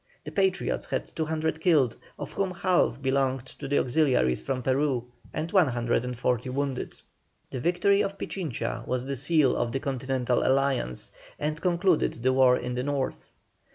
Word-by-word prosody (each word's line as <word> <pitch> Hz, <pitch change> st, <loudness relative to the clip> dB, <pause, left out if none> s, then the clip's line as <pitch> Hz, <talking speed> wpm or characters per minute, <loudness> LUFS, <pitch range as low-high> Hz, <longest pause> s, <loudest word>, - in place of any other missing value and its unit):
The -, -, -7 dB
Patriots 190 Hz, -2 st, 0 dB
had -, -, -4 dB
200 160 Hz, 0 st, -1 dB
killed, 150 Hz, -10 st, +3 dB, 0.2 s
of -, -, -6 dB
whom 195 Hz, -1 st, 0 dB
half 180 Hz, -5 st, +2 dB
belonged 135 Hz, -1 st, +1 dB
to -, -, -5 dB
the 145 Hz, -, +1 dB
auxiliaries 125 Hz, -, +2 dB
from 125 Hz, -, -3 dB
Peru, 130 Hz, -2 st, +1 dB, 0.3 s
and 160 Hz, +2 st, -3 dB
140 125 Hz, -, +1 dB
wounded. 135 Hz, 0 st, -3 dB, 0.6 s
The 130 Hz, -, -3 dB
victory 180 Hz, +7 st, +3 dB
of 195 Hz, 0 st, -2 dB
Pichincha 120 Hz, -, -4 dB
was 125 Hz, 0 st, -1 dB
the 140 Hz, 0 st, -2 dB
seal 145 Hz, 0 st, +3 dB
of 120 Hz, -1 st, -1 dB
the 135 Hz, -, -1 dB
continental 130 Hz, -2 st, -1 dB
alliance, 135 Hz, -, 0 dB, 0.3 s
and 150 Hz, +1 st, -3 dB
concluded 175 Hz, -9 st, +1 dB
the 130 Hz, 0 st, +3 dB
war 130 Hz, -1 st, +5 dB
in 125 Hz, -, -4 dB
the 125 Hz, -, -1 dB
North. 140 Hz, 0 st, -3 dB
135 Hz, 155 wpm, -27 LUFS, 125-160 Hz, 0.6 s, war